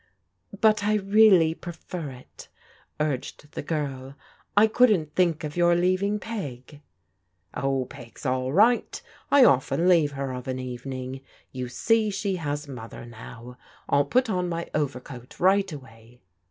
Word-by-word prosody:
" 205 -3 -17
But 215 -1 +2
I 210 +1 +2
really 195 -5 +5
prefer 170 -2 -7
it," 130 -1 -13 0.5
urged 150 0 -3
the - - -5
girl. 140 -3 -4 0.2
" - - -36
I 210 - +8
couldn't 210 -9 +3
think 170 -4 +1
of 150 -1 -5
your 175 0 +4
leaving 185 +4 +1
Peg.'* 145 - -7 0.4
" 95 - -49 0.3
Oh, 135 -1 -1
Peg's 120 +1 -13
all 130 0 0
right. 220 - +3 0.3
I 280 -3 +7
often 135 - +3
leave 165 -5 +4
her 135 -1 -3
of 125 0 -7
an 130 0 -2
evening. 130 +1 -6 0.3
You 125 -1 -5
see 220 - +2
she 195 -1 -2
has 145 -2 -4
Mother 120 -3 -9
now. 120 +1 -11 0.3
I'll 140 0 +3
put 255 - +2
on 180 -4 -1
my 170 0 -4
overcoat 130 -4 -4
right 195 +1 +3
away." 120 -4 -12
150 Hz, 155 wpm, -25 LUFS, 130-190 Hz, 0.5 s, I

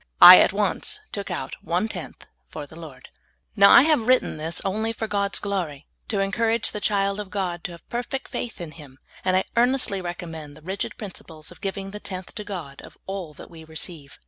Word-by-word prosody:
I - - +13
at - - +5
once 425 0 0
took 200 -1 -5
out 155 -7 -4
one 180 +5 0
tenth - - -8 0.2
for 145 - -6
the 150 - -15
I^ord. 150 -6 -10 0.5
Now 200 -2 +8
I - - +9
have 295 -7 +2
written 255 -9 +3
this 160 +2 -3
only 220 +4 -1
for 225 - -3
God's 200 -2 0
glory, 175 -8 -3 0.2
to 210 -5 -1
encourage 225 +3 +1
the 210 - -5
child 200 -1 +1
of 205 -2 -5
God 180 -4 -3
to 175 - -4
have 170 - -14
perfect 245 +3 -4
faith 240 - -5
in 170 -3 -6
Him, 145 -4 -13 0.3
and 185 0 +3
I 190 - +2
earnestly 240 -5 +2
recommend 165 -4 -7
the 155 - -16
rigid 190 +3 -4
principles 165 -7 -7
of 175 - -15
giving 195 0 -4
the 210 - -7
tenth 185 -3 -5
to 210 - -6
God 175 -9 -7
of - - -14
all 190 -6 -5
that - - -12
w^e 160 -1 -12
receive. 160 -2 -6
190 Hz, 205 wpm, -24 LUFS, 160-210 Hz, 0.5 s, I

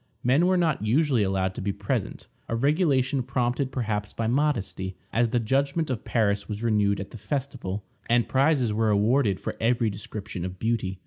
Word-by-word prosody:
Men 140 +8 +4
were 185 0 +3
not 160 - +1
usually 130 +2 +2
allowed 95 -1 0
to - - -6
be 100 - -1
present, 100 +2 -3 0.2
a 115 - 0
regulation 140 -1 +2
prompted 125 +2 -1
perhaps 105 -5 -2
by 115 - -2
modesty, 110 -8 0 0.2
as 120 0 +2
the 120 +1 +1
judgment 140 +6 0
of 120 - -3
Paris 100 -3 0
was 105 +1 -4
renewed 105 -3 +2
at 95 - -6
the 115 - -9
festival, 105 -4 -3 0.3
and 120 0 +3
prizes 135 -4 +2
were 110 +1 +1
awarded 105 0 +2
for - - -4
every 115 -1 +2
description 100 -2 -6
of 90 0 -5
beauty. 110 -3 -1
115 Hz, 180 wpm, -26 LUFS, 100-135 Hz, 0.3 s, Men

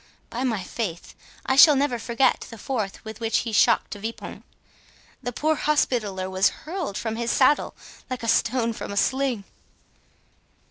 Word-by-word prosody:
By 245 +3 -3
my 225 -7 -1
faith, 180 -4 -5 0.3
I 265 - +1
shall 295 +2 +9
never 270 -3 0
forget 235 +3 +1
the 230 - -10
force 215 -4 -3
with 220 0 -8
which 225 -1 +1
he 230 - -3
shocked 210 - +3
De 205 - -6
Vipont. 225 +3 -7 0.8
The 245 - -3
poor 310 +6 +1
Hospitaller 235 -11 0
was 190 +1 +3 0.2
hurled 325 - -4
from 225 -1 -3
his 235 0 -2
saddle 270 +4 +3 0.3
like 255 -2 -4
a - - -3
stone 230 +1 +2
from 215 - -6
a 200 - -5
sling." 265 -3 +1
230 Hz, 165 wpm, -24 LUFS, 215-265 Hz, 0.8 s, shall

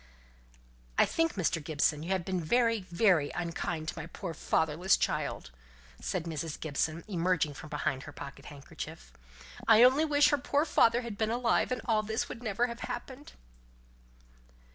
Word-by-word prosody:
"I - - +6
think, 330 0 0
Mr. 165 -4 0
Gibson, 150 0 +1
you 165 - -6
have 190 -3 0
been 185 -3 -2
very 230 +4 +2
very 170 -5 +3
unkind 170 -2 -3
to - - -6
my 160 - -6
poor 170 0 -6
fatherless 160 +4 +1
child," 65 - -2 0.5
said 180 - -2
Mrs. 160 -2 -4
Gibson, 155 +2 -2
emerging 175 -5 0
from 155 - -10
behind 140 -3 -2
her - - -8
pocket 140 0 -10
handkerchief. 100 - -9 0.5
"I 225 +1 +8
only 260 +5 +6
wish 290 -1 +4
her 290 - +2
poor 285 +3 +1
father 240 -6 +4
had 230 -4 -7
been 220 -1 +1
alive, 240 +1 +1
and 255 - -1
all 220 -2 +2
this 220 +1 -2
would 230 - -8
never 225 0 0
have 235 -1 -6
happened." 255 +3 -7
185 Hz, 165 wpm, -30 LUFS, 155-235 Hz, 0.5 s, I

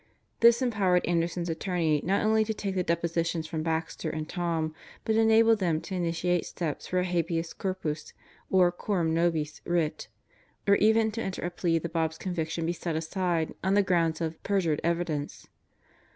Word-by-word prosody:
This 235 +2 +6
empowered 195 -7 +2
Anderson's 170 0 0
attorneys 165 -3 0
not 195 +4 +1
only 220 0 +4
to 220 0 -2
take 200 -2 -3
the 185 - 0
depositions 170 -1 -1
from 160 0 -3
Baxter 160 0 -2
and 155 -1 -4
Tom, 165 -3 -2 0.3
but 220 - +1
enabled 225 0 +5
them 170 -5 +1
to - - -7
initiate 175 0 0
steps 160 -5 -4
for 185 - -1
a 180 - +3
habeas 170 -2 -1
corpus 165 -6 -4 0.4
or 180 -2 +4
cor 185 +1 -2
am 160 -1 +1
nobis 165 -3 0
writ, 170 -3 -1 0.6
or 200 - +6
even 220 +1 +4
to 225 +2 -4
enter 190 -4 -4
a 175 - -2
plea 170 -1 +1
that 165 0 -4
Bob's 160 -1 0
conviction 165 -2 -3
be 170 - 0
set 170 -1 -4
aside 165 0 -1
on 190 +2 +2
the 205 - +5
grounds 170 -4 +1
of 160 -1 -3
"perjured 180 -7 0
evidence." 165 -4 -2
170 Hz, 175 wpm, -28 LUFS, 165-190 Hz, 0.6 s, This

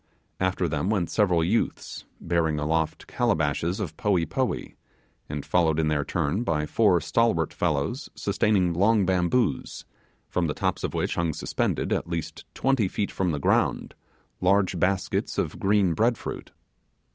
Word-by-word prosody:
After 95 -1 0
them 80 +4 -1
went 100 -6 0
several 90 -6 +2
youths, 105 +8 -1
bearing 80 -2 0
aloft 80 +1 -1
calabashes 85 - 0
of 85 -7 -4
poee 95 -5 +1
poee, - - -2 0.6
and 75 -1 -4
followed 80 -3 +2
in 80 -1 +1
their 75 -1 +1
turn 85 +5 -1
by 75 -9 0
four 95 +1 +3
stalwart 85 -3 +1
fellows, 75 - -1
sustaining 100 -3 +1
long 100 +3 +3
bamboos, 90 - 0 0.4
from 90 -2 0
the 75 - -2
tops - - -1
of - - -2
which - - 0
hung 85 -2 0
suspended, - - -1
at - - -2
least 85 -2 -5
twenty 135 -6 +2
feet 100 +2 -2
from 95 -2 -1
the 75 - -1
ground, 70 - +1 0.5
large 95 -1 +2
baskets 95 +2 0
of - - -2
green 100 -3 +3
bread 115 +6 +2
fruits. - - -7
90 Hz, 150 wpm, -26 LUFS, 80-100 Hz, 0.6 s, four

